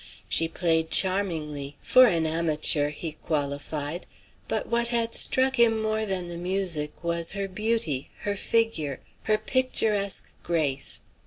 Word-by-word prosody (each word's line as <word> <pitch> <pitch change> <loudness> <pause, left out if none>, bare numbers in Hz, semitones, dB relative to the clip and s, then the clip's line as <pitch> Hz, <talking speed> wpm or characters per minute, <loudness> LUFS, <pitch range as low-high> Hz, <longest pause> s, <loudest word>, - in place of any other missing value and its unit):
She 165 - +2
played 160 -1 0
charmingly 155 -7 +1
"for 255 0 +6
an 165 -5 +1
amateur," 155 -2 +1
he 155 +2 -6
qualified: 145 +1 -4 0.4
but - - -1
what 235 0 0
had 230 -1 0
struck 265 0 +2
him 225 -2 +4
more 220 0 -1
than 190 -2 -1
the 170 0 -6
music 175 -4 0
was 170 0 0
her 200 0 -2
beauty, 195 - -1
her 205 0 -2
figure, 195 - 0 0.3
her 215 -1 +2
picturesque 215 -4 0
grace. 145 -6 -1
175 Hz, 135 wpm, -26 LUFS, 155-220 Hz, 0.4 s, for